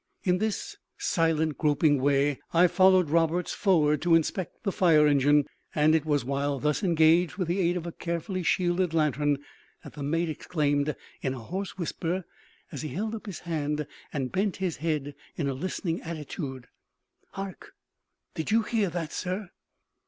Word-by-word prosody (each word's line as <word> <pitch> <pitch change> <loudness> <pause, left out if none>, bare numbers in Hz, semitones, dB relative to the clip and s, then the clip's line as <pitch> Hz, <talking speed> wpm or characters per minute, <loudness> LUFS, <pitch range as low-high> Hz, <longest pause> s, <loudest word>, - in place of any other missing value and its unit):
In 180 -1 +2
this 220 - -2 0.2
silent, 165 - +1
groping 145 -2 +3
way 140 0 +2
I 170 +2 +6
followed 185 -2 +4
Roberts 165 +2 +1
forward 150 -7 +3
to 170 -1 +4
inspect 165 +2 -1
the 200 - 0
fire 165 -5 +5
engine; 145 0 +4 0.3
and 155 +1 +4
it 160 -2 +2
was 145 -4 +1
while 140 +1 -1
thus 150 +2 0
engaged 170 0 +4
with 185 -3 -2
the 175 +3 0
aid 175 -1 +2
of 170 - -5
a 170 - -4
carefully 170 +3 -3
shielded 175 0 +1
lantern, 145 -2 +2 0.5
that - - -11
the 145 - -8
mate 165 +4 0
exclaimed, 150 -2 0 0.3
in 130 -1 -1
a - - -7
hoarse 185 - -5
whisper, 175 +1 -2 0.5
as 145 - -5
he 155 - -4
held 215 +8 -3
up 220 -1 -7
his 195 - -6
hand, 150 -3 -2 0.3
and 135 -3 -3
bent 195 0 0
his 185 -4 -2
head 150 -3 -2 0.2
in 150 - -1
a 135 - 0
listening 170 +3 -3
attitude 150 -5 -6 0.7
"Hark! 195 -1 -7 0.6
did 160 - -4
you 225 +1 +3
hear 215 -4 0
that, 165 -2 -4
sir?" 185 +1 -3
165 Hz, 165 wpm, -27 LUFS, 150-180 Hz, 0.7 s, I